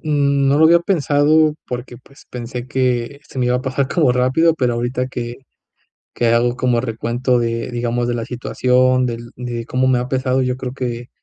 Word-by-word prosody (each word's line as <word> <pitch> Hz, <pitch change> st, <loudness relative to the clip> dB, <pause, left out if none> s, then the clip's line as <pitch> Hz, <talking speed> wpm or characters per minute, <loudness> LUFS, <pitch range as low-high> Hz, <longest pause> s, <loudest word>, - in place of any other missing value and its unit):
n 140 Hz, -2 st, +2 dB
no 140 Hz, +2 st, +3 dB
lo 160 Hz, -, +6 dB
había 170 Hz, +1 st, +6 dB
pensado, 155 Hz, -3 st, +2 dB
porque, 125 Hz, 0 st, -6 dB
pues 135 Hz, +1 st, -20 dB
pensé 125 Hz, +1 st, -6 dB
que 130 Hz, 0 st, -1 dB
se -, -, -9 dB
me 125 Hz, -, +1 dB
iba 125 Hz, 0 st, +2 dB
a 125 Hz, -, -4 dB
pasar 130 Hz, 0 st, -1 dB
como 150 Hz, -7 st, +2 dB
rápido, 130 Hz, +7 st, +3 dB
pero, 125 Hz, -6 st, 0 dB
ahorita 125 Hz, +2 st, -2 dB
que 120 Hz, -2 st, -5 dB, 0.8 s
que 120 Hz, -, +1 dB
hago 120 Hz, +1 st, +2 dB
como 125 Hz, -2 st, +1 dB
recuento 120 Hz, +1 st, -1 dB
de, 115 Hz, +1 st, -2 dB
digamos 120 Hz, 0 st, -1 dB
de 120 Hz, -, 0 dB
la 115 Hz, -1 st, -3 dB
situación 130 Hz, +1 st, +1 dB
del 120 Hz, 0 st, -6 dB
de 120 Hz, -1 st, -5 dB
cómo 130 Hz, +1 st, 0 dB
me 130 Hz, -1 st, +3 dB
ha 125 Hz, +1 st, -2 dB
pesado, 130 Hz, 0 st, 0 dB
yo 125 Hz, 0 st, -1 dB
creo 130 Hz, -1 st, -5 dB
que 120 Hz, -2 st, -5 dB
125 Hz, 200 wpm, -19 LUFS, 120-135 Hz, 0.8 s, lo